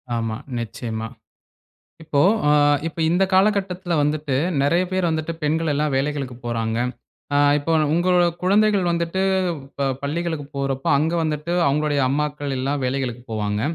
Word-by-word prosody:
ஆமா. 115 -1 -2 0.2
நிச்சயமா. 115 -1 -5 1.0
இப்போ 150 -3 0 0.3
ஆ - - +5 0.4
இப்ப 165 - -6
இந்த 185 +3 +3
காலகட்டத்துல 190 -2 +1
வந்துட்டு 150 -2 0 0.3
நெறைய 170 +6 +2
பேரு 185 -1 +1
வந்துட்டு, 160 +1 -2
பெண்கள் 160 +1 0
எல்லாம் 150 0 0
வேலைகளுக்குப் 135 -3 -3
போறாங்க. 115 -1 -1 0.6
ஆ - - +4 0.2
இப்போ 150 +3 -2 0.2
உங்களோட 175 +1 +3 0.2
குழந்தைகள் 200 -1 +3
வந்துட்டு 170 +2 -1 0.5
இப்ப 140 0 -3 0.2
பள்ளிகளுக்கு 160 0 -2
போறப்ப, 135 -1 -2
அங்க 160 +4 0
வந்துட்டு 155 +2 -2
அவங்களுடைய 145 0 +1
அம்மாக்கள் 145 0 -2
எல்லாம் 140 +2 -1
வேலைகளுக்கு 125 -2 -2
போவாங்க. 105 -1 -1
150 Hz, 130 wpm, -22 LUFS, 135-170 Hz, 1.0 s, ஆ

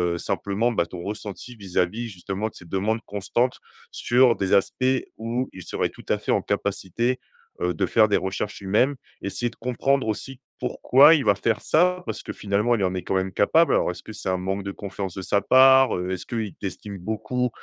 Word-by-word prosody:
heu, - - -3
simplement, 105 +8 -1
bah 105 - +1
ton 85 +1 -8
ressenti 105 +4 -7
vis-à-vis 100 +3 -2
justement 95 +2 -4
de - - -25
ces 85 - -13
demandes 100 +6 -1
constantes 120 +5 -1 0.3
sur 120 -1 +3
des 95 0 -1
aspects 100 +5 +2 0.3
où 120 +3 -2
il 95 - -10
serait - - -2
tout - - -15
à - - +2
fait - - -2
en - - +2
capacité, 120 +7 -1 0.4
heu, 90 0 +1
de - - 0
faire 110 -1 +4
des 105 - +3
recherches 95 +2 -3
lui-même, 110 +8 +1 0.2
essayer 120 +5 -2
de 115 - -18
comprendre 130 +3 0
aussi 125 +4 -4 0.2
pourquoi 135 +4 +5
il 145 - 0
va 105 - +4
faire 105 +2 -1
ça? 180 +3 +2
Parce - - -4
que, - - -7
finalement, 105 +4 +1
il 105 - -1
en 90 -1 +1
est 90 -2 -4
quand 95 - -2
même 95 0 0
capable. 160 - +3
Alors - - +2
est-ce 90 0 -6
que - - -9
c'est 95 - -5
un 95 - +1
manque 95 +2 -3
de 100 - -4
confiance 95 -2 -6
de 95 - -5
sa 100 - +2
part, 130 +2 +6
heu? 90 +1 -3
Est-ce 95 - -4
qu'il 110 -5 -3
t'estime 100 +1 -6
beaucoup 110 +6 -2
105 Hz, 210 wpm, -24 LUFS, 95-125 Hz, 0.4 s, part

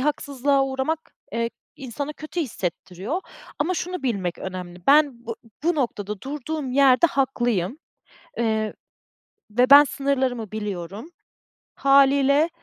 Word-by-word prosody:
haksızlığa 280 -1 +1
uğramak, 270 +4 -3 0.2
eee, 230 0 -1 0.3
insana 280 +2 -5
kötü 310 +3 -5
hissettiriyor. 200 - -4 0.4
Ama 340 +6 0
şunu 360 -2 -4
bilmek 195 -9 -2
önemli; 180 -1 -7
ben, 280 -5 +4
bu 230 - -4 0.3
bu 345 +1 +2
noktada 210 -7 -2
durduğum 290 -1 -4
yerde 275 +3 +5
haklıyım, 245 - 0 0.6
eee, 220 -2 0 0.8
ve 245 +5 +2
ben 290 +1 +11
sınırlarımı 260 -6 -1
biliyorum. 205 - -5 0.7
Hâliyle, 280 +3 +4
265 Hz, 110 wpm, -24 LUFS, 220-290 Hz, 0.8 s, ben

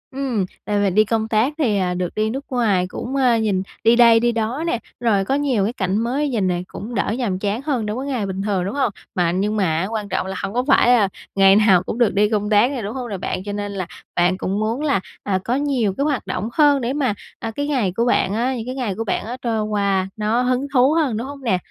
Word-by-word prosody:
Ừm, 255 -8 -1 0.2
đợt 205 -1 0
mình 190 -2 0
đi 215 +1 +5
công 220 0 0
tác 225 +6 +1
thì, 235 -10 +1
à, 180 -2 0
được 180 -1 -3
đi 215 0 0
nước 270 +5 -5
ngoài, 215 -8 +1
cũng, 245 +8 -5
ơ, 255 -3 +3
nhìn 205 -4 0 0.2
đi 230 +2 +5
đây 235 -1 +6
đi 240 +1 +2
đó 230 +6 -2
nè, 240 - 0 0.2
rồi 215 -5 +2
có 270 - 0
nhiều 275 -8 +1
cái 215 +4 -1
cảnh 190 -4 -1
mới 260 +6 0
nhìn 215 -7 0
nè, 175 -1 0
cũng 230 +5 -7
đỡ 210 - 0
nhàm 205 -8 -1
chán 205 +4 -2
hơn, 270 -6 -1
đối 210 0 -3
với 270 +2 -4
ngày 250 -7 -1
bình 190 0 -4
thường, 195 -3 -1
đúng 200 - -4
hông? 265 -6 +1 0.2
Mà 175 -2 +2
nhưng 200 +4 0
mà 205 - +2 0.2
á 190 - -1
quan 215 -2 -4
trọng - - -1
là 190 - -4
hông 195 +1 -3
có 250 +1 +1
phải 270 - +5
là 240 -5 +5 0.3
ngày 195 0 +6
nào 200 -4 +5
cũng 215 - -4
được 235 -4 +3
đi 205 +1 +3
công 210 -1 -1
tác 215 +5 +4
nè, 265 -4 -3
đúng 210 +1 -4
hông 250 -2 -4
nè 200 - -3
bạn? 185 - -4
Cho 205 - -5
nên 205 0 -4
là 190 -3 -4 0.3
bạn 180 +1 +2
cũng 195 +1 -2
muốn 225 +5 -1
là, 285 -9 +1 0.2
à, 190 -2 0
có 240 - 0
nhiều 265 -8 0
cái 280 - +1
hoạt 290 -4 -1
động 200 +5 -3
hơn 290 -2 +4
để 240 +2 -1
mà, 275 -7 0 0.3
à, 225 - -4
cái 285 +6 -3
ngày 250 -10 0
của 235 - +1
bạn 200 -5 +2
á, 245 +4 0
những 225 -2 -5
cái 255 +1 -5
ngày 240 -8 -2
của 225 - -3
bạn 225 - -2
á, 240 +3 -5
trôi 225 -3 -1
qua 200 -3 0
nó 215 +3 +1
hứng 255 +2 0
thú 260 +2 +4
hơn, 295 -9 +1
đúng 235 +4 -4
hông 280 -1 -9
nè? 225 -7 +2
220 Hz, 275 wpm, -21 LUFS, 200-255 Hz, 0.3 s, đây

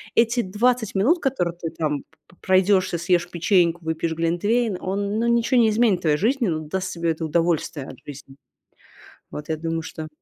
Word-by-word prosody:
Эти 235 +1 +3
20 220 +3 0
минут, 260 - +3
которые 180 - -1
ты 165 -1 -4
там 150 -3 -2
п - - -44 0.2
п - - -21
пройдешься, 185 -1 +2
съешь 175 0 +1
печеньку, 175 -1 +1
выпьешь 160 0 -1
глинтвейн, 185 +7 0
он, 200 +2 -2
ну, 230 - 0
ничего 235 +2 +3
не 225 - +4
изменит 215 -4 +2
в - - -17
твоей 150 -2 +2
жизни, 240 - +1
но 160 -3 -1
даст 185 +5 -4
тебе 170 -1 -1
это 160 0 -4
удовольствие 160 -3 -1
от - - -10
жизни. 140 -1 -11 1.0
Вот, 150 - -7
я 160 - 0
думаю, 165 +1 -3
что 160 -1 -7
180 Hz, 190 wpm, -23 LUFS, 165-220 Hz, 1.0 s, не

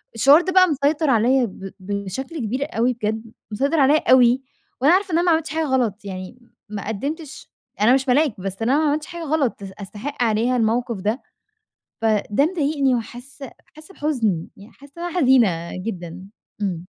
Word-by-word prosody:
الشعور 275 +8 +6
ده 370 - -2
بقى 370 0 +6
مسيطر 295 +1 +1
عليّا 250 +2 +3
ب 195 -2 -9
بشكل 200 - -5
كبير 255 +4 -2
أوي 245 +2 +2
بجد. 220 -1 -3 0.3
مسيطر 280 +9 0
عليّا 285 +3 +3
أوي، 250 0 +5 0.4
وأنا 290 +6 +5
عارفة 380 -1 +1
إن - - +3
أنا 345 - +2
ما 350 - +4
عملتش 320 0 +1
حاجة 320 0 -1
غلط. 240 -7 -1
يعني 185 +4 -7 0.3
ما 205 -1 -6
قدِّمتش 280 - -5 0.3
أنا 225 +4 +5
مش 265 +1 +1
ملاك، 270 -4 +2
بس 195 +2 -5
أنا 250 +5 +2
ما 315 - +1
عملتش 300 +1 -1
حاجة 340 -1 -7
غلط 285 -9 -1
أس 195 - -7
أستحِق 215 +7 -5
عليها 235 +3 +1
الموقف 235 +1 0
ده. 215 +6 -1 0.8
فده 220 +3 +2
مضايقني 290 -6 +1
وحاسّة 245 +3 -7 0.2
حاسّة 310 +5 -13
بحُزن. 225 - -1
يعني 205 +4 -14
حاسّة 280 0 -17
إن 340 - -6
أنا 350 +1 -2
حزينة 225 - +3
جدًا.إمم. 185 -1 -6
250 Hz, 175 wpm, -21 LUFS, 210-295 Hz, 0.8 s, الشعور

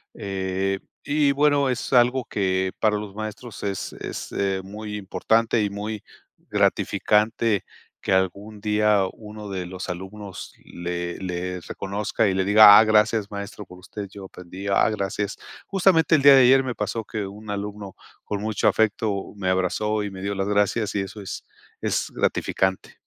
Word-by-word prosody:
Eh, 95 0 -2 0.2
y, 145 -1 +2
bueno, 145 -1 +3
es 125 +2 -3
algo 125 0 +4
que 95 -1 0
para 105 -1 +2
los 105 -2 -7
maestros 110 +1 -7
es 100 -2 -3
es, - - -7
eh, 95 -1 -1
muy 105 +1 -7
importante 110 +3 +1
y 100 - 0
muy 105 +1 -5 0.5
gratificante 105 0 +1 0.4
que - - -3
algún 100 +3 0
día 105 -1 +2
uno 105 -1 -10
de 95 -2 -4
los 95 +1 -7
alumnos 95 +2 -7
le 85 0 -4
le 90 -1 -4
reconozca 100 +3 -2
y 95 - +1
le 95 0 +1
diga: 105 +1 +9
"Ah, 110 - +8
gracias, 110 -1 +2
maestro, 100 0 -7
por 90 0 -14
usted, 100 +1 -7
yo 100 -1 -10
aprendí, 95 +2 -9
ah, 100 +2 +3
gracias". 100 0 -3 0.3
Justamente 175 -5 +4
el 145 - +2
día 140 0 +9
de 130 - +7
ayer 135 +2 +6
me 125 -2 -3
pasó 105 +1 -3
que 105 -2 -4
un 105 +2 -10
alumno 100 -1 -5 0.3
con 100 -1 -3
mucho 110 -1 0
afecto 105 -2 0
me 95 -2 -1
abrazó 105 +3 0
y 100 - -4
me 95 -1 -9
dio 100 +1 -2
las 95 0 -1
gracias, 105 +1 +1
y 100 - +1
eso 95 +2 -7
es 95 - -7 0.4
es - - -1
gratificante. 95 0 -1
105 Hz, 165 wpm, -24 LUFS, 95-110 Hz, 0.5 s, diga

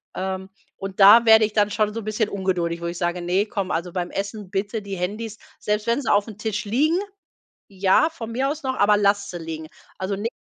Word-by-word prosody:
Ähm, 190 0 -4 0.3
und 195 0 -7
da 205 +4 +9
werde 220 -1 +7
ich 210 - -6
dann 210 -1 +3
schon 210 0 0
so 230 - -4
'n - - -11
bisschen 215 0 0
ungeduldig, 180 -4 -2
wo 170 - -3
ich 170 0 -5
sage: 175 0 -1
„Ne, 180 +4 +1
komm, 200 -4 -3
also 175 +2 -2
beim 180 -1 -2
Essen 200 0 -5
bitte 205 +3 -2
die 200 -1 -6
Handys“, 210 +5 -4 0.2
selbst 210 0 -1
wenn 235 +4 +1
sie 255 - 0
aufm 205 +1 +1
Tisch 215 0 -3
liegen, 290 - +2 0.7
ja, 195 - +3
von 235 -9 -8
mir 265 +4 0
aus 310 +2 -5
noch, 260 -1 -2
„aber 205 0 +4
lasst 200 0 +1
sie 175 - -6
liegen.“ 160 -1 -7 0.3
Also 190 +1 -3
nicht 225 +5 -3
205 Hz, 225 wpm, -23 LUFS, 190-220 Hz, 0.7 s, da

